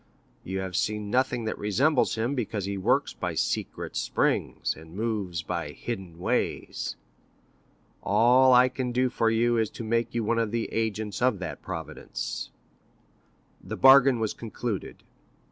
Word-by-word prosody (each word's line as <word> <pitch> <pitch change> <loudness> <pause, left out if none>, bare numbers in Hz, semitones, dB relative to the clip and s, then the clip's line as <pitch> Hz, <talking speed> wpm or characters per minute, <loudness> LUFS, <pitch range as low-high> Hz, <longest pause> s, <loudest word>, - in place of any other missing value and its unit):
You 95 +1 -3
have 95 -2 -5
seen 105 +1 -1
nothing 125 -2 +1
that 110 - -3
resembles 125 - +2
him, 115 +4 -1
because 110 -6 -2
he 100 0 -3
works 95 - +1
by - - -4
secret - - -2
springs, - - 0
and 80 +2 -13
moves 100 -6 -2
by 85 -4 -4
hidden 95 -7 -6
ways. 90 - -2 1.1
All 125 +5 +5
I 125 0 +7
can 130 -1 -3
do 125 +1 +1
for 115 - +2
you 115 +1 +2
is 110 -2 +1
to - - -8
make 115 +1 -1
you 115 - 0
one 115 +2 +1
of 115 -2 0
the 115 +1 -2
agents 110 -2 -2
of 125 -4 +3
that 95 -3 -6
Providence.' - - -5 1.1
The - - -6
bargain 135 -2 +7
was 110 -2 -1
concluded. 115 -2 -5
110 Hz, 150 wpm, -27 LUFS, 100-120 Hz, 1.1 s, I